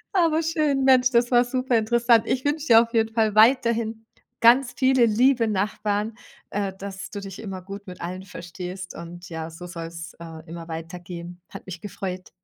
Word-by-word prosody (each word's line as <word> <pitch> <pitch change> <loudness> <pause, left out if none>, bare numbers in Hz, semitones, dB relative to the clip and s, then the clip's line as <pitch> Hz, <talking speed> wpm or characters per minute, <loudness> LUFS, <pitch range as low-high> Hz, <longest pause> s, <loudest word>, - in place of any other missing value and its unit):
Aber 330 -3 +3
schön, 305 -4 +1
Mensch, 255 -1 +5
das 240 0 +2
war 240 0 +6
superinteressant. 235 -2 +2
Ich 260 +1 -1
wünsche 300 +2 -1
dir 225 -1 +8
auf 230 0 -11
jeden 225 -1 +2
Fall 220 -2 +2
weiterhin 225 -1 +3 0.4
ganz 245 +2 +5
viele 260 -2 +4
liebe 235 +1 +3
Nachbarn, 210 +1 -1 0.4
äh, 200 -1 -1
dass 195 -1 -7
du 205 - -6
dich 195 -2 -8
immer 195 -4 -6
gut 200 +1 -9
mit 180 - -9
allen 180 +2 -5
verstehst 180 +1 -8
und 175 +1 -9
ja, 160 -1 -5
so 165 +2 -10
soll's, 165 -2 -7
äh, 165 -1 -10
immer 165 0 -8
weitergehen. 175 +1 -8
Hat - - -10
mich 175 -2 -8
gefreut. 185 -3 -6
210 Hz, 175 wpm, -24 LUFS, 180-240 Hz, 0.4 s, dir